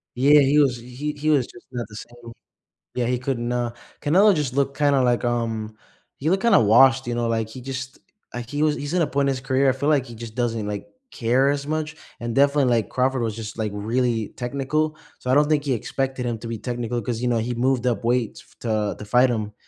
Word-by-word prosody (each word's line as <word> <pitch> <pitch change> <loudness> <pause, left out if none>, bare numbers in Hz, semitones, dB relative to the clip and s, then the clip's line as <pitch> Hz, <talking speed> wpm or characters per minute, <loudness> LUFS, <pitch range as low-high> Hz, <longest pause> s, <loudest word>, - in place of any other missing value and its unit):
Yeah, 145 +4 +6
he 140 +2 +4
was 130 -4 +3
he 125 +5 -5
he 155 +2 -1
was 140 -5 +3
just 120 - -15
not 120 -2 -4
the 105 - -12
same. 120 +1 -11 0.6
Yeah, 120 -2 0
he 125 0 0
couldn't, 125 -2 -2
uh 120 -1 -1 0.3
Canelo 190 +7 +5
just 145 -5 -1
looked 140 0 0
kinda 145 -2 +3
like, 120 0 +1
um 115 -2 -2 0.4
he 150 - -2
looked 190 +3 +1
kinda 235 - +5
washed, 130 +4 +5
you 120 - -2
know, 120 -1 -1
like, 115 -1 -1
he 125 +3 -9
just 130 0 -6 0.3
like, 120 -1 -6
he 145 +1 -1
was 150 -1 +3
he's 145 +3 -4
in 180 - +3
a - - +2
point 140 0 0
in 135 - +1
his 130 - -6
career, 135 0 +1
I - - +5
feel 135 +3 -2
like 140 -4 +2
he 120 - -10
just 115 -1 -8
doesn't, 115 -4 -1
like, 105 -1 -4 0.3
care 130 +4 +2
as 140 0 -2
much? 155 0 -2 0.3
And 120 -1 -3
definitely, 140 0 +4
like, 120 -4 +1
Crawford 130 0 0
was 110 -2 -2
just, 110 -1 -7
like, 110 -1 -1
really 115 +1 0
technical, 140 +5 -1 0.2
so 125 - -3
I - - +5
don't 145 +1 +4
think 150 -2 +1
he 140 - 0
expected 130 +2 -2
him 115 -2 -2
to 115 - -8
be 115 -2 -4
technical 120 0 -3
'cause, 115 +1 -3
you 125 - +1
know, 120 -1 +2
he 120 +2 -2
moved 125 +1 +1
up 115 -2 0
weights 120 -2 0
f - - -26
to 110 -3 -1
to 105 - -7
fight 125 +4 +4
him. 105 -2 -2
125 Hz, 245 wpm, -23 LUFS, 115-140 Hz, 0.6 s, Yeah